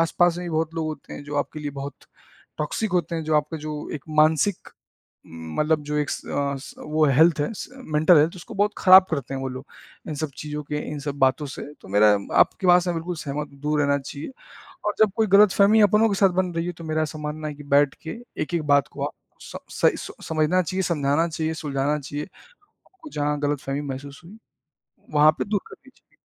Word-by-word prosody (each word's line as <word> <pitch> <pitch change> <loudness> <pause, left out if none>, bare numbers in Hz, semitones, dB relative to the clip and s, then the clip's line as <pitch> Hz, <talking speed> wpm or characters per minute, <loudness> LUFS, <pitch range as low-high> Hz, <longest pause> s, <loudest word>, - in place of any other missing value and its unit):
आस-पास 170 +1 +2
में 180 - -5
भी - - -4
बहुत 160 0 -1
लोग 160 -1 -2
होते 155 -2 -7
हैं - - -7
जो 145 0 -5
आपके 145 +2 -2
लिए 145 -1 -4
बहुत 140 0 -5 0.6
टॉक्सिक 175 +8 -2
होते 170 -2 0
हैं, 160 - -2
जो 155 0 +2
आपका 150 +2 -1
जो 150 -1 -5
एक 145 - -7
मानसिक 155 +5 +3 0.6
उम, 80 -1 -9
मतलब 155 0 +2
जो 150 0 -3
एक 150 -1 -1
स - - -4
अ, 140 0 -1
स - - -11 0.4
हेल्थ 160 -1 +5
है 145 - -1
स - - -7 0.3
मेंटल 160 +3 +6
हेल्थ 155 +3 +3
है - - -12
उसको 180 +6 -10
बहुत 205 +1 +1
ख़राब 185 -1 +8
करते 140 -3 -3
हैं 135 - -3
वो 135 - -3
लोग, 130 +1 -7 0.4
इन 155 - -3
सब 155 0 -3
चीज़ों 150 0 -5
के 150 +1 -3
इन 150 - -4
सब 140 0 -4
बातों 135 +2 +2
से। 135 - -7 0.2
तो - - -14
मेरा 105 +2 +5 0.3
आप - - +5
के 185 - -1
बात 180 0 +6
से 175 0 -1
बिल्कुल 170 +1 -4
सहमत 150 -1 -4
हूँ, 140 - -17
दूर 150 0 0
रहना 140 0 +2
चाहिए 140 - -7 0.6
और 210 - +1
जब 215 -3 +5
कोई 220 -1 +2
गलतफ़हमी 210 +1 +6
अपनों 210 +2 +4
के 200 - 0
साथ 195 0 +4
बन 180 -1 -5
रही 165 - -1
है 180 - -2
तो - - -8
मेरा 155 0 -1
ऐसा 155 0 -6
मानना 150 +1 -4
है 150 - -4
कि 145 - -11
बैठ 145 -1 +4
के 160 - -6 0.2
एक-एक 165 +1 -1
बात 140 -2 +3
को - - -6
आप - - -5 0.3
स - - -10 0.3
सही - - +4
सो - - -8
समझना 160 +3 +1
चाहिए, 185 +3 -2
समझाना 150 0 +1
चाहिए, 160 0 -2
सुलझाना 145 -1 -1
चाहिए। 145 +1 -5 0.4
आपको 375 -5 -17
जहाँ 150 - -1
गलतफ़हमी 145 -1 -2
महसूस 140 0 -7
हुई, 205 +5 -13 0.8
वहाँ 150 +1 +7
पे - - 0
दूर 205 0 0
करनी 265 - -15
चाहिए। - - -33
155 Hz, 230 wpm, -24 LUFS, 145-175 Hz, 0.8 s, ख़राब